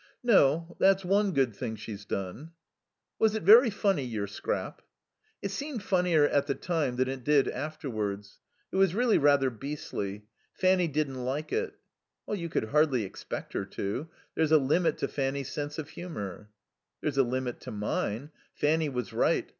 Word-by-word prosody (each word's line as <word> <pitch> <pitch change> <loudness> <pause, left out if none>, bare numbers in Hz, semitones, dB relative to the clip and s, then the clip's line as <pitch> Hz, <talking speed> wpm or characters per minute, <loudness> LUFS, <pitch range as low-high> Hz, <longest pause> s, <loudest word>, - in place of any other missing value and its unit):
"No. 170 - +4
That's 195 0 +4
one 200 +2 +3
good 135 - +1
thing 110 +2 -4
she's 105 -1 -8
done." 100 - -5 0.7
"Was 220 -1 +3
it 220 - -2
very 230 +7 +8
funny, 200 -7 +1
your 110 -5 -3
scrap?" 100 - -4 0.6
"It 200 - -2
seemed 275 -2 -4
funnier 180 -6 +3
at 140 -1 +1
the 140 - 0
time 160 -8 -1
than 130 +1 +1
it 130 -1 -4
did 145 0 +4
afterwards. 110 -10 -4 0.3
It - - -2
was 190 -2 +4
really 240 -1 +3
rather 140 -2 +4
beastly. 115 -6 -5 0.3
Fanny 185 -1 +3
didn't 140 -4 -2
like 140 +5 -3
it." 440 -2 -1 0.5
"You 175 -5 -3
could 110 - -1
hardly 145 -5 +3
expect 95 - -7
her - - -1
to. 100 +9 -4 0.2
There's 160 -1 +1
a 160 - +8
limit 150 +5 +2
to 140 - -1
Fanny's 135 -1 -2
sense 145 +1 -4
of 155 -1 -5
humour." 105 - -7 0.5
"There's 140 -3 -1
a - - +7
limit 125 0 -2
to - - -8
mine. 105 +5 -2 0.2
Fanny 155 +1 +2
was 125 -4 -4
right. - - +2
145 Hz, 165 wpm, -29 LUFS, 125-175 Hz, 0.7 s, very